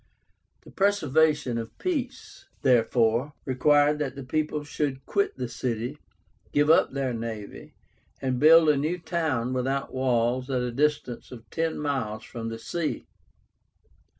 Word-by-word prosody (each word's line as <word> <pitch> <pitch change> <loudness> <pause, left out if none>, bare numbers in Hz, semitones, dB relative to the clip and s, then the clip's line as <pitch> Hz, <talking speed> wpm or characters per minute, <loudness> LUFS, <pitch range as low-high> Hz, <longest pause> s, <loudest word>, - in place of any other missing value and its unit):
The - - -14
preservation 155 - +2
of 115 0 -8
peace, 275 -8 -4 0.2
therefore, 120 +1 +3
required 145 +3 +3
that 140 -3 -2
the 140 - -7
people 150 +2 -1
should 145 -2 -3
quit 200 -1 0
the 125 -1 -3
city, 120 +4 -3 0.5
give 145 +2 +4
up 165 - +4
their 135 -2 -1
navy, 110 -3 -7 0.4
and 130 -2 -1
build 160 +2 +7
a 150 - +4
new 155 +6 -1
town 155 -8 -1
without 135 +2 -2
walls 125 0 +1
at 130 -2 0
a 125 - -2
distance 145 -2 -1
of 120 -2 -11
ten 165 0 -1
miles 130 -8 -2
from 115 -1 -6
the 115 - -5
sea. 160 +7 -3
135 Hz, 140 wpm, -26 LUFS, 125-150 Hz, 0.5 s, build